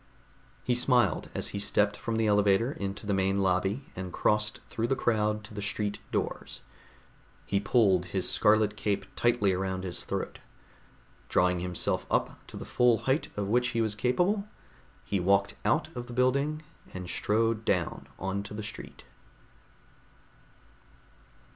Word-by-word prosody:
He 125 - +1
smiled 125 0 +2
as - - -1
he 100 - -4
stepped 105 0 +2
from 115 +2 -3
the 110 0 +1
elevator 105 +3 +3
into 100 -4 -5
the 100 - 0
main 95 0 +1
lobby 95 +7 0
and 95 -1 -5
crossed 105 +3 +1
through 115 +1 -2
the 135 - +1
crowd 105 -3 +1
to 110 - -11
the 105 - -5
street 105 +1 -2
doors. - - -3 0.8
He 100 - +1
pulled 100 -4 +3
his 90 +1 -2
scarlet 105 0 +3
cape 105 -1 -1
tightly 120 -5 +2
around 95 0 -2
his 90 -2 -4
throat. - - -4 0.9
Drawing 90 0 +3
himself 90 -1 -2
up - - 0
to - - -9
the - - -7
full 125 -2 +3
height 135 +4 +1
of 100 -1 -1
which 125 +3 +2
he - - +3
was 110 -2 0
capable, 180 - +1 0.6
he 100 - 0
walked 100 +2 +2
out - - +1
of 120 0 -5
the 120 - -8
building 140 +5 +1 0.3
and 90 -1 -5
strode 110 +4 +1
down 90 -6 -1
onto 100 +2 -4
the 110 - -5
street. 110 - -9
105 Hz, 150 wpm, -29 LUFS, 95-120 Hz, 0.9 s, elevator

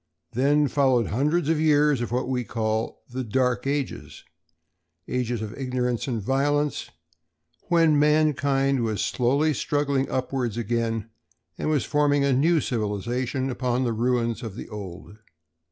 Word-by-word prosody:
Then 145 +4 +3
followed 130 -4 +2
hundreds 150 +7 +1
of 160 -1 +2
years 150 -3 +3
of 120 - -3
what 125 +1 -1
we 125 -1 -1
call 110 -1 -2
the 130 +1 -4
"Dark 125 +1 0
Ages,"—ages 90 - -5
of 110 - -6
ignorance 125 -2 -2
and 120 -4 -1
violence, 145 +5 0 0.8
when 165 -4 +4
mankind 140 -3 +2
was 110 -3 -1
slowly 140 +5 +1
struggling 140 0 0
upwards 130 -3 -2
again 115 -1 -2 0.4
and - - -2
was 150 -3 +1
forming 145 -1 +2
a 140 -1 +2
new 155 +5 +3
civilization 120 +4 -2
upon 125 0 -1
the 120 -2 0
ruins 120 0 0
of 110 -5 -6
the - - -7
old. 95 -1 -9
125 Hz, 135 wpm, -25 LUFS, 115-145 Hz, 0.8 s, when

